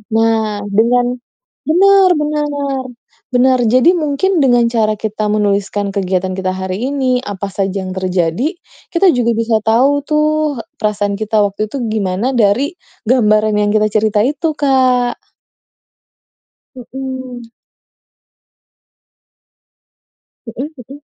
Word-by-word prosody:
Nah, 225 -2 +1
dengan 245 +4 +2 0.5
benar 385 +3 +5
benar. 300 -1 -1 0.9
Benar. 255 +1 +4
Jadi 255 +8 +4
mungkin 340 +2 0
dengan 245 -5 +3
cara 220 -2 +1
kita 215 0 -3
menuliskan 205 -1 0
kegiatan 190 -2 -1
kita 185 0 -2
hari 190 0 -4 0.2
ini, 260 -2 +1
apa 200 -1 -5
saja 195 0 -2
yang 185 - -6
terjadi, 185 - -1 0.4
kita 370 +2 +5
juga 240 -5 +1
bisa 225 0 +1
tahu 275 +6 +2
tuh, 305 -3 0 0.2
perasaan 205 -1 -1
kita 215 0 +1
waktu 205 +1 -1
itu 255 +5 -5
gimana 205 +2 -1
dari 240 +3 +2 0.3
gambaran 215 -3 +2
yang 205 0 +1
kita 215 0 +2
cerita 215 0 +1
itu, 300 +5 -1
Kak. 255 -4 +1 1.6
Heeh. 260 -1 -7 3.0
Heeh 245 +5 -6
heeh. 260 +3 -11
230 Hz, 110 wpm, -15 LUFS, 205-270 Hz, 3.0 s, benar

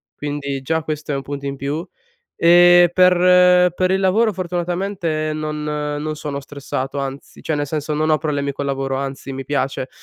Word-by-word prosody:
quindi 140 -2 -4
già 160 +4 0
questo 150 -1 -4
è - - 0
un 135 - -2
punto 140 +1 -6
in 140 0 -4
più, 145 +6 -4 0.5
e 175 +1 +6
per 180 0 +5
per 185 0 +1
il 190 - +2
lavoro 210 +4 +2
fortunatamente 175 -3 -2
non 155 0 -4
non 150 0 -3
sono 145 -2 -5
stressato 140 -1 -5
anzi, 135 0 -7
cioè 160 - -2
nel 145 -1 -2
senso, 150 0 -3
non 155 +1 0
ho 155 - +4
problemi 145 -2 -2
col 140 +1 -4
lavoro 135 -1 -2
anzi, 135 0 -5
mi 135 0 -6
piace. 135 -1 -2
150 Hz, 180 wpm, -20 LUFS, 140-175 Hz, 0.5 s, e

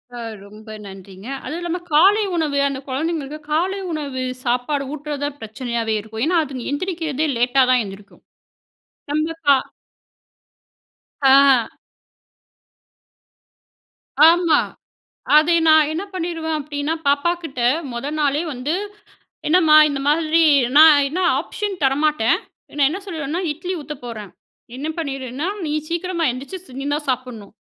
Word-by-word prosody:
ஆ - - -7 0.2
ரொம்ப 215 +2 -12
நன்றிங்க! 195 0 -12 0.2
அதுவும் 320 +3 -4
இல்லாம 345 +1 -3
காலை 390 +8 +5
உணவு. 305 -4 0
அந்த 275 -1 -4
குழந்தைகளுக்கு 305 +1 -3
காலை 370 +5 0
உணவு 285 -5 -4 0.2
சாப்பாடு 250 +4 -1
ஊட்டுறது 295 -1 -5
தான் 290 0 -5
பிரச்சனையாவே 225 0 -3
இருக்கும். 220 +2 -6
ஏன்னா 350 +2 +2
அது 265 -4 -7
எந்திரிக்கிறதே 315 -2 -2
லேட்டா 250 +3 +3
தான் 250 -1 +4
எந்திரிக்கும். 200 +1 -12 0.9
நம்ப 310 +2 0 0.2
கா 280 - +8 1.7
ஆ. 270 -1 +6 3.0
ஆமா. 335 -2 +3 0.8
அதை 320 +3 +4
நான் 310 -1 +5
என்ன 325 +5 -3
பண்ணிருவேன் 330 -3 -3
அப்படீன்னா, 290 +1 -3
பாப்பாகிட்ட 300 0 0 0.3
முதல் 235 +4 -4
நாளே 290 0 +1
வந்து 260 +5 -3 0.8
என்னம்மா 315 -2 +5
இந்த 280 -2 -3
மாதிரி 320 +2 +3 0.3
நான் 300 -2 +8
என்ன 315 +6 -4 0.2
ஆப்ஷன் 415 -2 -4
தரமாட்டேன். 275 -3 +2 0.4
நான் 280 -2 +4
என்ன 360 - -4
சொல்லிருவேனா? 320 -2 -3
இட்லி 355 +5 -5
ஊத்த 300 +1 -7
போறேன். 215 -5 -7 0.5
என்ன 285 +4 -4
பண்ணிருனா, 270 0 -4 0.2
நீ 300 - -2 0.2
சீக்கிரமா 340 0 -2
எந்திச்சு 280 +3 -9
நீ - - -5
தான் 295 0 -4
சாப்பிடணும். 250 -5 -5
295 Hz, 120 wpm, -20 LUFS, 255-325 Hz, 3.0 s, கா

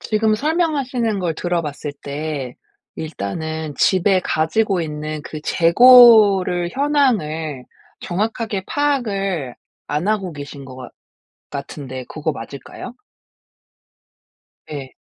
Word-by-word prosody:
지금 215 0 +1
설명하시는 270 - 0
걸 175 -3 -1
들어봤을 155 -4 -3
때 140 -3 -4 0.4
일단은 160 +3 -5
집에 190 0 +3
가지고 180 +5 0
있는 155 -1 -4
그 155 0 -7
재고를 200 -3 +6
현황을 200 - 0 0.4
정확하게 210 +1 -2
파악을 195 - -1 0.3
안 150 +7 -2
하고 200 -5 -1
계신 145 -1 -9
것 130 -1 -11
같 125 -2 -9 0.6
같은데 135 -2 -7
그거 155 0 -3
맞을까요? 140 - -9 1.8
예. 140 -3 -6
175 Hz, 215 characters per minute, -20 LUFS, 150-220 Hz, 1.8 s, 재고를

